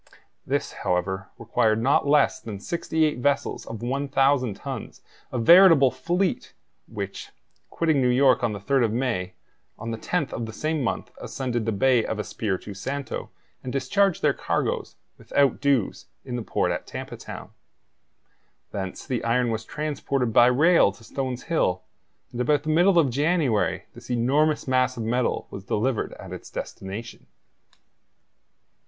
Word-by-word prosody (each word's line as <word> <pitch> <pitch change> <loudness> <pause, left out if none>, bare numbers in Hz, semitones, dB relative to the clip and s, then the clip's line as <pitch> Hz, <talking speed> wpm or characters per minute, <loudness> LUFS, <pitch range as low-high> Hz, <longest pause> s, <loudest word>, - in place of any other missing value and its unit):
This, - - -1
however, 95 +2 -1
required 115 -1 +1
not 135 +4 +2
less 150 +1 +3
than 105 -3 -7
sixty 160 - 0
eight 150 -5 -1
vessels 140 +3 0
of 115 0 -7
1,000 135 -2 +1
tons, 130 +1 -7 0.3
a - - -2
veritable 165 +1 +7
fleet, 180 - -1 0.3
which, - - -6 0.4
quitting 160 -4 +1
New 125 - +3
York 130 0 +4
on 120 - +2
the 100 - -5
3rd 130 +4 +2
of 110 - -1
May, 110 -7 -2 0.4
on 115 +1 -5
the 115 - -4
10th 175 -1 -2
of 115 -1 -3
the 110 - -8
same 155 +2 -1
month 115 - -3
ascended 120 -4 -3
the - - +2
Bay 120 +3 +3
of 110 - -3
Espiritu 105 -1 -3
Santo, 135 +7 -5 0.3
and 130 - -4
discharged 155 +9 +1
their - - +4
cargoes, - - -2 0.2
without 140 -1 +1
dues, 140 -7 0 0.2
in 125 -2 -4
the 120 - -2
port - - 0
at - - -4
Tampa - - -6
Town. - - -9 1.2
Thence 95 -2 -5
the 125 -4 -2
iron 120 +1 +1
was 110 0 -3
transported 140 -3 -2
by 120 - +7
rail 150 - +5
to 100 - -18
Stones 130 +1 -4
Hill, 160 - 0 0.5
and 120 - -3
about 145 +3 +2
the 155 - -4
middle 175 +4 +4
of 145 -6 +4
January 145 - +1
this - - -13
enormous 140 +6 +1
mass 130 -1 +2
of 115 - -3
metal 120 +2 0
was 95 - -7
delivered 115 +4 -1
at - - -9
its - - -9
destination. 100 +5 -7
125 Hz, 155 wpm, -25 LUFS, 115-145 Hz, 1.2 s, veritable